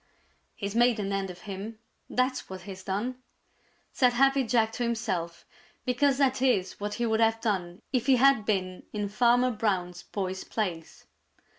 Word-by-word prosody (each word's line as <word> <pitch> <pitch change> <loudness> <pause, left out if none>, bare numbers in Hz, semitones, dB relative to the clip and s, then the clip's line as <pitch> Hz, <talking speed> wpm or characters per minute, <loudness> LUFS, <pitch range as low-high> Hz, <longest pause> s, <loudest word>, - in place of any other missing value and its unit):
"He's 200 -2 -4
made 240 -1 +4
an 200 -1 -2
end 195 -1 -1
of 180 0 -10
him, 210 +2 -6 0.3
that's 255 +1 0
what 190 0 -7
he's 190 -2 -9
done!" 235 +7 -3 0.7
said 250 -2 +3
Happy 270 +2 +4
Jack 225 -2 +2
to 245 - -3
himself, 215 -8 -2 0.4
because 265 +2 +2
that 265 -2 +2
is 205 -8 +1
what 205 0 -3
he 240 - -1
would 220 -1 +1
have 225 0 +3
done 190 -3 -2
if 250 -2 +1
he 270 - +6
had 265 -3 +5
been 185 -3 -1
in 210 -1 -2
Farmer 245 +3 +3
Brown's 185 -5 -1
boy's 190 -2 -4
place. 175 -7 -4
220 Hz, 165 wpm, -28 LUFS, 190-245 Hz, 0.7 s, he